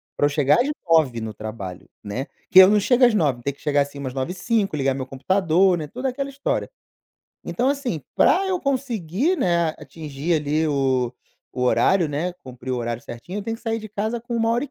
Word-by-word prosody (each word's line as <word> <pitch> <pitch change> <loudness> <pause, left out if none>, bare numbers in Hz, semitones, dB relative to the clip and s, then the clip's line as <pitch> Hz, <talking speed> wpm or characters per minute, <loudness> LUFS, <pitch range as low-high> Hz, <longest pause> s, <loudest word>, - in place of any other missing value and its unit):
pra - - +2
eu 145 - +3
chegar 145 +1 +3
às 255 - +2 0.2
9h 155 -8 +3
no 110 -1 -4
trabalho, 100 -4 -7 0.2
né. 110 +6 -4 0.3
Que 185 - +9
eu 190 0 +10
não 210 0 +4
chego 245 +5 +4
às 240 - +4
9h, 145 - +1
tenho 140 0 -2
que - - -24
chegar, 145 -1 +2
assim, 140 0 -4
umas 130 -2 -5
9:05, 185 - -1
ligar 135 -2 +1
meu 130 -1 -4
computador, 180 +6 +2
né, 155 -2 -5
toda 255 - -3
aquela 275 +2 -4
história. 275 +1 -2 0.8
Então, 250 +3 0
assim, 275 - -1
pra 385 +2 +4
eu 375 -1 0
conseguir, 260 - -1
né, 170 - +2
atingir 155 +1 -4
ali 155 +1 0
o 130 -4 +1 0.4
o 125 - -4
horário, 170 +6 +3
né, 155 +5 -2
cumprir 130 0 -8
o 130 - 0
horário 120 0 -3
certinho, 145 +12 -8
eu 205 - -4
tenho 225 +2 -3
que - - -23
sair 225 -1 -1
de 215 - -8
casa 215 +3 -3
com 240 +1 -6
1 225 -1 +1
hora 240 +4 +1
e 285 - -11
165 Hz, 215 wpm, -23 LUFS, 135-225 Hz, 0.8 s, eu